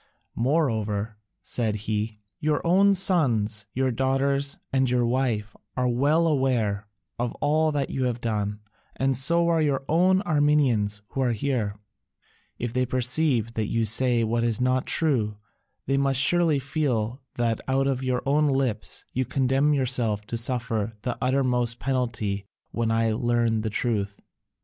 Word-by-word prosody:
Moreover," 110 -6 -1 0.3
said 110 -4 -1
he, 105 0 -2 0.2
"your 150 +1 0
own 195 +3 +4
sons, 115 - +1
your 130 +2 0
daughters, 135 +3 0 0.2
and 130 -1 +2
your 125 -1 +2
wife 115 -4 -1 0.2
are 125 0 +1
well 145 +7 +2
aware 120 -9 0 0.3
of 120 -1 -1
all 155 +1 +1
that 145 -2 -2
you 130 -1 -1
have 120 -1 -1
done, 105 -3 -2 0.3
and 135 0 +1
so 170 +7 +2
are 165 -1 +2
your 140 -3 0
own 185 +4 +3
Armenians 140 - +1
who 135 - -3
are 125 -2 +1
here: 115 -3 -2 0.8
if 120 -1 -4
they 130 - +1
perceive 125 -1 +1
that 110 -2 -2
you 115 0 0
say 120 +2 +2
what 115 +1 0
is 115 -2 0
not 130 +1 +1
true, 120 -10 +1 0.5
they 135 +1 +1
must 135 -1 +2
surely 165 +1 +4
feel 135 -4 -2
that 115 -2 0
out 135 +1 +1
of 135 -1 -1
your 125 -1 -1
own 150 +2 +2
lips 135 -6 -1
you 130 - 0
condemn 135 +3 +1
yourself 120 -6 +1
to 115 - -5
suffer 115 -2 -1
the 125 - -2
uttermost 125 -2 +1
penalty 115 -6 -2 0.2
when 115 -1 -1
I 115 0 +1
learn 115 -1 +1
the 110 - -2
truth." 105 -2 -2
125 Hz, 150 wpm, -25 LUFS, 115-140 Hz, 0.8 s, own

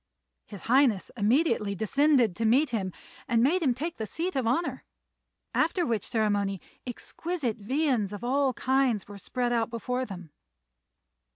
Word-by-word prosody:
His 200 -5 -10
Highness 245 -5 +3
immediately 215 -2 +2
descended 245 - +3
to 230 - -3
meet 250 +6 +3
him, 195 -5 -1 0.4
and 235 -3 +3
made 340 +8 +3
him 260 -6 +2
take 320 +6 -4
the 220 - -4
seat 355 - -3
of 260 -4 0
honour; 260 +1 0 0.7
after 340 +2 +1
which 230 -6 -1
ceremony 205 -3 0 0.3
exquisite 260 0 -4
viands 245 -2 0
of 205 +1 -7
all 265 +1 +2
kinds 260 -5 +1
were 205 -1 -10
spread 245 +4 -1
out 230 -2 +1
before 250 +2 -2
them. 180 -7 -9
240 Hz, 150 wpm, -28 LUFS, 210-275 Hz, 0.7 s, Highness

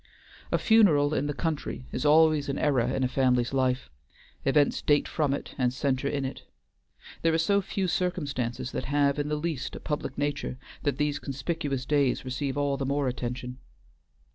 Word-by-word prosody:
A - - +3
funeral 160 -10 +4
in 145 - 0
the 145 - -1
country 150 -5 -3
is 130 - -1
always 155 -1 +5
an 140 - -1
era 135 -5 +2
in 135 - 0
a - - +3
family's 125 -1 +1
life; 130 - 0 0.5
events 145 +1 +3
date 145 -1 +3
from 150 -3 0
it 140 - -4
and 125 -1 +2
centre 130 +1 -1
in 140 -1 -1
it. 130 - -5 0.8
There 165 -1 +3
are - - +3
so 200 +5 +2
few 190 0 -2
circumstances 145 -10 -2
that - - -3
have 140 0 +2
in 145 - -1
the 150 - 0
least 150 -3 -3
a - - -6
public 145 -3 -4
nature 145 -3 -2 0.2
that 140 -2 -1
these 150 -1 0
conspicuous 140 -1 -3
days 140 -3 +1
receive 135 +2 -3
all 140 -1 +1
the 135 - -2
more 140 0 0
attention. 125 0 -4
140 Hz, 180 wpm, -28 LUFS, 130-150 Hz, 0.8 s, always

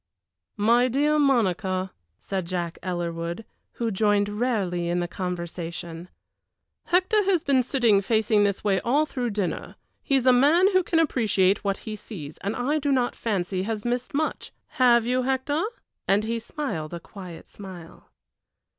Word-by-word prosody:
"My 235 +4 +4
dear 295 +4 +2
Monica," 190 - +1 0.3
said 190 - -4
Jack 175 -2 -3
Ellerwood, 170 +2 -3 0.3
who 230 -1 -2
joined 205 0 +2
rarely 190 -8 0
in 175 +1 0
the 175 - -1
conversation, 175 -1 -5 0.8
"Hector 375 +4 +3
has 370 -5 +2
been 275 -2 +3
sitting 240 -6 +3
facing 215 0 +2
this 200 -1 0
way 195 -2 +2
all 280 +10 +2
through 250 -5 -3
dinner. 205 -4 -3 0.3
He 275 - 0
is 260 -2 +2
a 255 - +7
man 320 +10 +5
who 370 - +5
can 335 -1 -1
appreciate 215 - +2
what 195 -1 0
he 215 -1 -4
sees, 175 -8 -9
and 200 +2 -3
I 285 +5 0
do 285 -1 0
not 250 -2 +1
fancy 190 -4 -1
has 215 +2 -3
missed 245 +2 -2
much 310 +2 -2 0.2
have 240 -3 +4
you, 250 +1 +1
Hector?" 265 +5 0 0.4
and 200 +2 +3
he 230 +1 -2
smiled 175 - -4
a - - -6
quiet 180 -2 -11
smile. 185 -5 -11
215 Hz, 155 wpm, -25 LUFS, 185-255 Hz, 0.8 s, a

